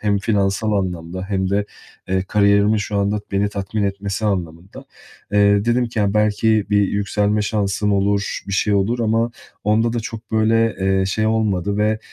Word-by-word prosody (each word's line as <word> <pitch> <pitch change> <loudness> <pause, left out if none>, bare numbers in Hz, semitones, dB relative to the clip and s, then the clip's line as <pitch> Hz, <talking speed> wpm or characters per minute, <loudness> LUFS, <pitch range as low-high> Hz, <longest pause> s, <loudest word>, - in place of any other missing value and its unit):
Hem 105 -1 +1
finansal 100 0 0
anlamda 95 -2 -3
hem 95 -2 -1
de, 100 +1 +1 0.4
eee, 95 0 +1
kariyerimin 100 +2 +3
şu 105 0 -3
anda 100 +1 0
beni 100 +1 +1
tatmin 100 +1 -3
etmesi 100 +1 -3
anlamında. 90 -3 -4 0.5
Eee, 100 0 +4
dedim 120 +1 +1
ki 115 -1 -6
ya, 100 -1 +1
belki 105 0 +2
bir 100 -1 +3
yükselme 105 +1 0
şansım 105 -1 0
olur, 100 0 0
bir 100 - -5
şey 100 +2 +1
olur 100 +5 +1
ama 115 +1 +1 0.3
onda 110 +3 +2
da 120 - -1
çok 110 0 -8
böyle, 110 +1 +2
eee, 95 0 +2
şey 110 +3 0
olmadı 100 -3 0
ve, 105 +1 +1
105 Hz, 170 wpm, -20 LUFS, 100-110 Hz, 0.5 s, Eee